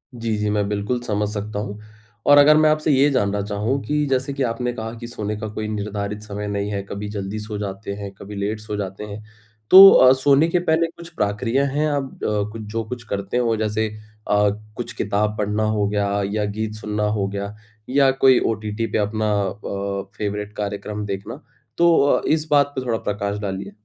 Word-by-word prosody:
जी, 115 Hz, -2 st, -2 dB
जी। 105 Hz, 0 st, -1 dB
मैं 105 Hz, -1 st, 0 dB
बिल्कुल 105 Hz, +4 st, -1 dB
समझ 105 Hz, -3 st, -1 dB
सकता 105 Hz, 0 st, -4 dB
हूँ। 105 Hz, 0 st, -5 dB, 0.5 s
और 145 Hz, -, +8 dB
अगर 150 Hz, +1 st, +7 dB
मैं 155 Hz, 0 st, +5 dB
आपसे 155 Hz, 0 st, +2 dB
ये 140 Hz, +1 st, +4 dB
जानना 100 Hz, -7 st, 0 dB
चाहूँ 105 Hz, +6 st, -1 dB
कि 150 Hz, 0 st, 0 dB
जैसे 135 Hz, +1 st, 0 dB
कि 135 Hz, -1 st, -1 dB
आपने 120 Hz, 0 st, -1 dB
कहा 110 Hz, -1 st, -5 dB
कि 120 Hz, -, -7 dB
सोने 105 Hz, -3 st, -4 dB
का 110 Hz, -, -4 dB
कोई 110 Hz, 0 st, -4 dB
निर्धारित 105 Hz, -1 st, -4 dB
समय 105 Hz, 0 st, -5 dB
नहीं 100 Hz, 0 st, -2 dB
है, 100 Hz, -1 st, -2 dB
कभी 105 Hz, +1 st, -5 dB
जल्दी 100 Hz, 0 st, -4 dB
सो 105 Hz, 0 st, -6 dB
जाते 100 Hz, 0 st, -5 dB
हैं, 100 Hz, -1 st, -7 dB
कभी 100 Hz, +1 st, -9 dB
लेट 100 Hz, +2 st, -2 dB
सो 105 Hz, 0 st, -6 dB
जाते 95 Hz, 0 st, -5 dB
हैं। 105 Hz, 0 st, -8 dB, 0.5 s
तो 195 Hz, +1 st, +12 dB
अ, 130 Hz, 0 st, +7 dB
सोने 140 Hz, +3 st, +4 dB
के 175 Hz, +1 st, +1 dB
पहले 165 Hz, -1 st, +2 dB
कुछ 170 Hz, -1 st, -10 dB
प्रक्रिया 115 Hz, +6 st, 0 dB
हैं? 145 Hz, +3 st, 0 dB
आप 140 Hz, -2 st, -4 dB
अ, 105 Hz, +1 st, -1 dB
जो 110 Hz, +1 st, -4 dB
कुछ 125 Hz, -1 st, -6 dB
करते 100 Hz, +3 st, -2 dB
हो 120 Hz, -2 st, +2 dB
जैसे 110 Hz, 0 st, 0 dB, 0.4 s
अ, 105 Hz, 0 st, +3 dB, 0.3 s
कुछ 120 Hz, -, -5 dB
किताब 105 Hz, +1 st, -1 dB
पढ़ना 105 Hz, +1 st, 0 dB
हो 100 Hz, -1 st, +1 dB
गया 100 Hz, 0 st, 0 dB
या 105 Hz, 0 st, 0 dB
गीत 105 Hz, +1 st, -3 dB
सुनना 105 Hz, 0 st, -3 dB, 0.2 s
हो 100 Hz, -, 0 dB
गया 100 Hz, +1 st, -5 dB, 0.3 s
या 135 Hz, 0 st, +4 dB
कोई 130 Hz, -1 st, +5 dB
ओटीटी 110 Hz, +1 st, -3 dB
पे -, -, +1 dB
अपना 110 Hz, +1 st, 0 dB
अ, 100 Hz, 0 st, -4 dB
फ़ेवरेट 105 Hz, 0 st, -3 dB
कार्यक्रम 105 Hz, 0 st, -4 dB
देखना। 100 Hz, -1 st, -6 dB, 0.4 s
तो 170 Hz, -4 st, +4 dB
इस 155 Hz, 0 st, +1 dB
बात 145 Hz, -1 st, +4 dB
पर 130 Hz, -, -3 dB
थोड़ा 115 Hz, -2 st, 0 dB
प्रकाश 100 Hz, 0 st, -2 dB
डालिए? 100 Hz, -1 st, -4 dB
105 Hz, 200 wpm, -22 LUFS, 100-125 Hz, 0.5 s, तो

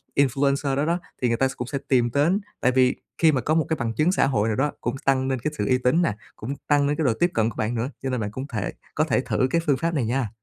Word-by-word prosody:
influencer 140 Hz, 0 st, +2 dB
đó 140 Hz, +2 st, +1 dB
đó, 170 Hz, +2 st, 0 dB, 0.2 s
thì 125 Hz, -, +2 dB
người 115 Hz, -1 st, +1 dB
ta 135 Hz, -, +3 dB
s -, -, -4 dB
cũng 125 Hz, -, -5 dB
sẽ 140 Hz, -, -2 dB
tìm 120 Hz, -3 st, +3 dB
đến. 160 Hz, +8 st, +3 dB, 0.2 s
Tại 125 Hz, -, +3 dB
vì 130 Hz, 0 st, +3 dB, 0.2 s
khi 160 Hz, -2 st, +5 dB
mà 130 Hz, -, 0 dB
có 150 Hz, -, 0 dB
một 160 Hz, -, +2 dB
cái 160 Hz, -, 0 dB
bằng 115 Hz, -1 st, -1 dB
chứng 155 Hz, +9 st, +2 dB
xã 190 Hz, -, +2 dB
hội 110 Hz, -5 st, +1 dB
nào 110 Hz, -, 0 dB
đó 145 Hz, +2 st, +1 dB
cũng 135 Hz, -, -2 dB
s -, -, -16 dB
tăng 130 Hz, -1 st, +2 dB
lên 130 Hz, -1 st, -1 dB
cái 155 Hz, +6 st, -3 dB
sự 105 Hz, -, -1 dB
uy 130 Hz, -, +3 dB
tín 130 Hz, +7 st, +2 dB
nè, 120 Hz, -, +1 dB, 0.2 s
cũng 120 Hz, +6 st, -5 dB
tăng 145 Hz, -1 st, +3 dB
lên 145 Hz, -, +1 dB
cái 160 Hz, -, 0 dB
độ 120 Hz, -, +3 dB
tiếp 175 Hz, +9 st, +1 dB
cận 110 Hz, 0 st, +2 dB
của -, -, -10 dB
bạn 110 Hz, +2 st, -1 dB
nữa, 115 Hz, +3 st, -1 dB
cho 135 Hz, -, -1 dB
nên 125 Hz, -2 st, -1 dB
bạn 105 Hz, -1 st, -3 dB
cũng 130 Hz, +5 st, -6 dB
thể 105 Hz, -8 st, -3 dB, 0.2 s
có -, -, +3 dB
thể -, -, +1 dB
thử 130 Hz, -, 0 dB
cái 165 Hz, -, +2 dB
phương 140 Hz, -3 st, +2 dB
pháp 165 Hz, +3 st, -1 dB
này 135 Hz, -7 st, 0 dB
nha. 120 Hz, 0 st, -1 dB
135 Hz, 320 wpm, -24 LUFS, 120-145 Hz, 0.2 s, khi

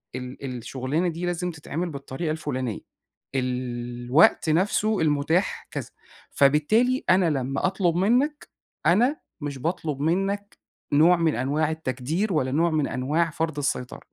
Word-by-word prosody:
ال 125 Hz, 0 st, -6 dB
الشُغلانة 135 Hz, +8 st, -2 dB
دي 170 Hz, +1 st, -3 dB
لازم 175 Hz, 0 st, -2 dB
تتعمل 165 Hz, +2 st, -4 dB
بالطريقة 140 Hz, +2 st, -4 dB
الفُلانية، 130 Hz, -7 st, -3 dB, 0.6 s
الوقت 125 Hz, +3 st, +1 dB
نَفسه 205 Hz, +5 st, +2 dB
المتاح 155 Hz, +4 st, +1 dB
كذا، -, -, -5 dB, 0.4 s
فبالتالي 215 Hz, -, +3 dB
أنا 185 Hz, -2 st, +5 dB
لمّا 135 Hz, 0 st, -1 dB
أطلب 180 Hz, -3 st, 0 dB
منك 250 Hz, -, +1 dB, 0.4 s
أنا 245 Hz, -, +4 dB, 0.2 s
مش 145 Hz, -2 st, -4 dB
باطلب 155 Hz, 0 st, -2 dB
منك 195 Hz, +6 st, -1 dB, 0.4 s
نوع 165 Hz, +5 st, +6 dB
من 165 Hz, -2 st, +1 dB
أنواع 145 Hz, +5 st, 0 dB
التكدير 160 Hz, -, -2 dB
ولا 130 Hz, -5 st, +1 dB
نوع 165 Hz, +4 st, +2 dB
من 155 Hz, -3 st, +1 dB
أنواع 155 Hz, +6 st, 0 dB
فرض 160 Hz, -1 st, -3 dB
السيطرة. 135 Hz, -3 st, -2 dB
155 Hz, 125 wpm, -25 LUFS, 135-180 Hz, 0.6 s, نوع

